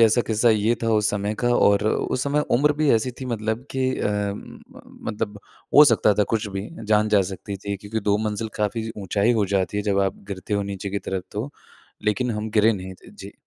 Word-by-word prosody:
ऐसा 115 +1 +5
किस्सा 115 +2 +2
ये 110 +1 +2
था 115 - +1
उस 105 0 +2
समय 105 +1 -2
का 120 +3 -1
और 100 -2 +4
उस 125 +3 0
समय 145 +2 +1 0.2
उम्र 150 +3 +3
भी 150 -2 +4
ऐसी 115 +3 0
थी - - -4
मतलब 110 +1 -2
कि 135 - -3 0.2
अ, - - 0
म 105 -1 -4 0.5
मतलब 105 -1 -4 0.4
हो 150 +1 +10
सकता 115 -5 +4
था - - +6
कुछ 110 - -1
भी, 100 +1 -5 0.2
जान 105 0 +3
जा 105 -2 +4
सकती 100 +1 -6
थी 100 -1 -2
क्योंकि 105 +3 -4
2 100 0 +2
मंजिल 110 +1 -3
काफ़ी 105 +2 -1
ऊँचाई 100 +3 +1
हो 110 -3 +2
जाती 95 +1 0
है 105 - 0
जब 100 -1 0
आप 95 -1 0
गिरते 100 +1 -4
हो 100 - +1
नीचे 100 0 -5
की 100 - -1
तरफ़ 95 -1 -2
तो, 110 +7 -4 0.5
लेकिन 120 +4 +1
हम 110 0 -3
गिरे 110 +1 +4
नहीं 95 -2 -6
थे। - - -17
जी। - - -11
105 Hz, 225 wpm, -23 LUFS, 100-115 Hz, 0.5 s, हो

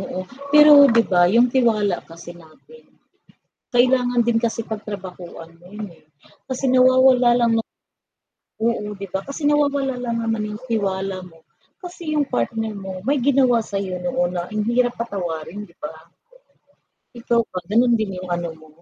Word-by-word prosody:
Oo, 185 -1 -5 0.3
pero 300 +1 +8 0.2
'di 230 0 +5
ba, 175 -1 +5
yung 235 +4 +5
tiwala 220 -6 +2
kasi 170 +1 -11
natin 170 - -18 0.9
kailangan 245 0 +3
din 235 -1 +2
kasi 230 0 -1
pagtrabahuan 185 -6 -8
mo 175 - -19
yun, 210 +3 -8
eh. 165 -2 -21 0.4
Kasi 260 +1 -4
nawawala 255 -1 +5
lang 235 -1 +2 1.1
Oo, 210 -3 -1
'di 200 0 -7
ba, 190 - 0
kasi 280 +3 -7
nawawala 285 -2 +1
lang 235 -1 -2
naman 225 -1 -1
yung 210 +2 -8
tiwala 195 -3 -2
mo, 165 -1 -22 0.4
kasi 345 -3 -6
yung 295 -1 +1
partner 220 - -2
mo 195 -2 -7
may 285 +3 +1
ginawa 255 -2 +3
sayo 195 -3 -4
noon 175 0 -1
na 175 -1 -3
ang 215 0 -2
hirap 245 0 +1
patawarin, 180 -5 -5
'di 170 - -24
ba? 150 - -7 1.2
Ikaw 235 0 0
ba, 185 - -4
gano'n 240 +2 +4
din 195 -4 -3
yung 185 - -8
ano 175 0 -4
mo? 155 0 -18
220 Hz, 155 wpm, -21 LUFS, 185-250 Hz, 1.2 s, pero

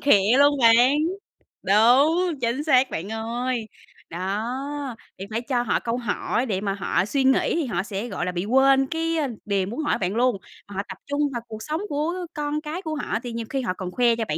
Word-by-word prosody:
khịa 215 -4 +4
luôn 285 0 +5
bạn. 240 +4 +6 0.7
Đúng, 280 - +4
chính 240 +4 0
xác 265 -4 +4
bạn 175 +5 -5
ơi. 230 +1 -2 0.4
Đó, 245 +9 -3 0.2
thì 195 - -5
phải 225 - -1
cho 245 -1 0
họ 235 - +1
câu 235 +1 -2
hỏi 240 +1 -1
để 195 -5 -2
mà 200 -2 -1
họ 190 -1 0
suy 270 +5 0
nghĩ 265 +4 +3
thì 330 -4 0
họ 195 -6 -1
sẽ, 205 +3 -4
gọi 185 -4 -3
là, 180 - -1
bị 175 +1 -3
quên 270 +3 +4
cái, 330 +2 -1
a, 300 -3 +1 0.2
điều 195 -2 0
muốn 235 +9 -5
hỏi - - +1
bạn 190 +2 -2
luôn, 245 -2 +2 0.3
họ 200 -1 -4
tập 190 - -7
trung 285 +1 -1
vào 235 - -3
cuộc 220 -1 -8
sống 310 +3 -3
của 300 +3 -1 0.2
con 295 0 -2
cái 315 +4 -5
của 315 -4 -4
họ 290 - -2
thì 245 - -5
nhiều 230 0 -4
khi 270 -1 -1
họ 185 - -1
còn 185 -1 -6
khoe 235 +2 +3
cho 225 -1 -2
bạn 150 - -1
245 Hz, 220 wpm, -24 LUFS, 210-285 Hz, 0.7 s, bạn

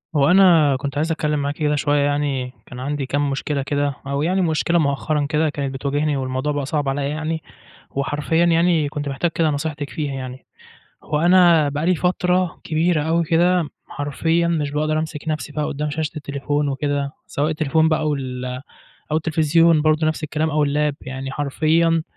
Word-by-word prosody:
هو 140 -1 +4
أنا 170 -7 +6
كنت 140 +1 -4
عايِز 160 +2 0
أتكلَّم 150 -2 0
معاكِ 145 +1 -2
كده 150 -2 0
شوية 145 0 +1
يعني، 140 -3 -1
كان 125 - -10
عندي 140 +1 -2
كام 145 +2 0
مشكلة 140 +1 -2
كده، 145 0 -1
أو 140 +1 -1
يعني 185 +5 +1
مشكلة 170 0 +1
مؤخرًا 145 0 0
كده 155 0 +1
كانت 140 -2 -3
بتواجِهني، 145 +2 -1
والموضوع 130 +2 -2
بقى 145 -1 -2
صعب 145 0 -1
عليَّ 140 +1 -1
يعني. 155 +1 -3 0.5
وحرفيًا 145 +4 0
يعني 165 -2 +3
كنت 145 0 -4
محتاج 160 +5 -1
كده 165 -1 +1
نصيحتِك 145 0 -3
فيها 145 -3 -3
يعني. 130 -1 -7 0.6
هو 150 - -1
أنا 170 -3 +5
بقى 145 +2 -2
لي 180 +1 +3
فترة 180 0 0
كبيرة 160 0 +1
أوي 165 +2 +1
كده، 170 0 +2 0.2
حرفيًا 160 +4 0
مش 155 -4 -1
باقدَر 155 +1 0
أمسِك 155 0 -5
نفسي 155 -1 -3
بقى 150 0 -2
قُدَّام 150 +1 -3
شاشة 155 +1 -2
التليفون 145 0 -2
وكده، 140 0 -1 0.2
سواء 145 +2 -1
التليفون 160 +1 +2
بقى 155 - +2
أو 155 -1 0
ال 125 -2 -5 0.7
أو 155 - +3
التلفزيون 160 +1 +3
برضو 155 +1 +2
نفس 155 0 -1
الكلام، 155 +1 -1
أو 150 -1 +2
الlap 145 0 0
يعني، 135 +1 -6
حرفيًا 160 +3 +1
150 Hz, 180 wpm, -21 LUFS, 140-160 Hz, 0.7 s, أنا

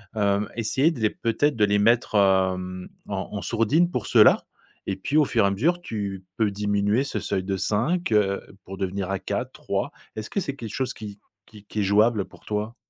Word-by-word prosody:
Hem, 100 0 +1
essayer 130 +7 +2
de 145 - -7
les 110 - +3
peut-être 115 +5 0
de 105 - +4
les 105 0 +2
mettre, 115 +1 +2
hem, 95 -2 +2 0.2
en 100 +1 -4
en - - -4
sourdine 115 - +2
pour - - -3
ceux-là - - +6 0.4
et 95 - -1
puis 95 +10 -4
au 150 - +5
fur 115 -5 +2
et - - +4
à - - +1
mesure, 160 - +1
tu 100 - -4
peux 110 -2 +2
diminuer 105 +4 +1
ce 115 - -3
seuil 95 -1 -2
de 95 0 -2
5, 120 - 0
heu, 100 -2 +2 0.2
pour 95 +1 -9
devenir 95 0 -3
à 95 - -1
4-3, - - -3 0.2
est-ce 110 0 -5
que 200 - 0
c'est 140 -6 -3
quelque 115 -6 -7
chose 130 -1 -1
qui 105 -2 -9 0.3
qui 105 -2 -16
qui 105 0 -3
est - - +1
jouable 105 +2 +3
pour - - -19
toi? 105 +2 -3
105 Hz, 210 wpm, -25 LUFS, 100-115 Hz, 0.4 s, ceux-là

